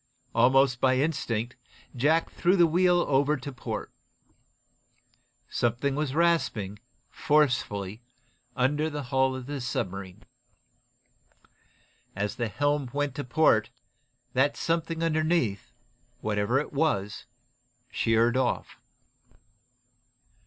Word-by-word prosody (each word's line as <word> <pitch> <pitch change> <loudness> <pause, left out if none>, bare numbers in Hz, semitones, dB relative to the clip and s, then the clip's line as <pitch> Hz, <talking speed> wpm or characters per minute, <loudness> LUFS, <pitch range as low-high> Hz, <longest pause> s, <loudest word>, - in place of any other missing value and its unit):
Almost 130 -1 +4
by 130 -1 +3
instinct 125 -5 -1 0.4
Jack 155 +6 +2
threw 180 +2 +2
the 175 -3 +6
wheel 175 +2 +3
over 145 +2 +2
to 140 +2 -7
port. 125 - -6 1.6
Something 120 +5 0
was 145 -1 -2
rasping, 140 - +1 0.3
forcefully, 120 -8 0 0.5
under 145 +5 +1
the 145 -1 -5
hull 130 0 +1
of 130 -1 -7
the 140 0 -5
submarine. 95 -3 -4 1.9
As 105 +1 -3
the 120 - -1
helm 145 +3 0
went 145 -1 -1
to 145 +2 -4
port 120 -4 +3 0.6
that 140 +3 +2
something 165 0 -1
underneath, 155 - 0 0.5
whatever 105 +4 0
it 150 - -5
was, 135 -10 -1 0.6
sheered 115 +1 +2
off. 130 -1 -1
135 Hz, 100 wpm, -27 LUFS, 115-150 Hz, 1.9 s, the